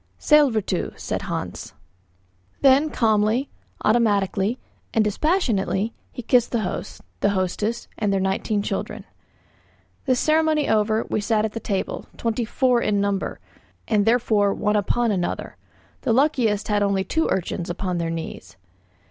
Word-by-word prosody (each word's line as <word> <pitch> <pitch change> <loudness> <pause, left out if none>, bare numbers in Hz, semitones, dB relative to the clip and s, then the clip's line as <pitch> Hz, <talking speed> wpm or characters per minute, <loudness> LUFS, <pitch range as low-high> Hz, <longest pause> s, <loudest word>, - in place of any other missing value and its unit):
"Sællvertu," 235 - +2
said - - -3
Hans. - - -5 0.9
Then 275 +3 +5
calmly, 220 +1 +1 0.3
automatically, 210 -1 +2 0.4
and 220 - +4
dispassionately 220 - 0 0.2
he 245 - -7
kissed 245 +1 +3
the 235 - 0
host, 185 - -5 0.2
the 205 - +2
hostess, 200 +4 -1
and 210 -2 +1
their 195 - +1
nineteen 195 +2 0
children. - - -4 1.0
This 255 -2 +3
ceremony 310 -1 +2
over, 220 +1 +2
we - - 0
sat 215 0 +1
at 220 +1 -5
table, 195 -2 -3
twenty 230 0 -1
four 250 +1 +2
in 205 -3 +1
number, 200 -1 -1 0.5
and 210 -2 +2
therefore 220 -4 +3
one 210 0 0
upon 230 +3 +1
another. 180 -3 -2 0.5
The 230 - +1
luckiest 240 -6 +2
had 210 -1 +1
only 200 -1 +1
two 320 - 0
urchins 175 -2 -2
upon 180 0 -2
their 165 -1 -1
knees. 165 -11 -6
215 Hz, 135 wpm, -23 LUFS, 200-240 Hz, 1.0 s, Then